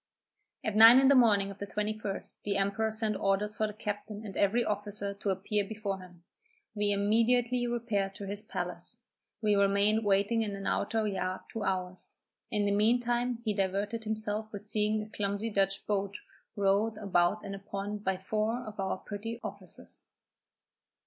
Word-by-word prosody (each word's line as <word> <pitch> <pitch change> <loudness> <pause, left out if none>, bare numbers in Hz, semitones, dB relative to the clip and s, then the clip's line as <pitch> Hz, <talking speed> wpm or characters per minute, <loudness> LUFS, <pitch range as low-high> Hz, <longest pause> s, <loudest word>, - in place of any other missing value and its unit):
At 215 - -2
nine 225 +3 +10
in 270 0 +5
the - - +7
morning 210 -6 +4
of 195 - -12
the 200 - -4
21st, 210 -1 -4
the 200 -1 -1
emperor 200 +3 0
sent 220 -1 -1
orders 200 +2 0
for 215 +1 0
the 210 - -7
captain 210 0 -5
and 195 - -7
every 225 +4 +2
officer 205 -1 -3
to 200 0 -3
appear 200 +2 0
before 200 -1 -4
him. 180 -2 -14 0.5
We 205 -1 0
immediately 230 +4 +2
repaired 215 -5 -1
to 200 - -7
his 200 +1 0
palace; - - -5 0.5
we 210 -1 +4
remained 200 +2 +3
waiting 205 +3 +2
in 205 -2 -2
an 195 0 -7
outer 225 -1 0
yard 185 -2 -2
two 225 - -4
hours; 185 -2 -3 0.3
in 210 -2 0
the 200 - +2
mean 215 +4 +4
time 240 0 -1
he 215 - +1
diverted 200 +3 -1
himself 215 0 -2
with 205 0 -7
seeing 210 0 +1
a - - -9
clumsy 205 +2 -2
Dutch 195 -1 +1
boat 200 -1 -1 0.4
rowed 205 +2 +2
about 195 -1 +1
in 195 - -5
a 195 - -6
pond 200 +1 -5
by 190 -2 0
four 215 +5 -1
of 210 -1 -9
our 190 -1 -1
petty 220 +4 -6
officers. - - -8
205 Hz, 175 wpm, -31 LUFS, 200-220 Hz, 0.5 s, nine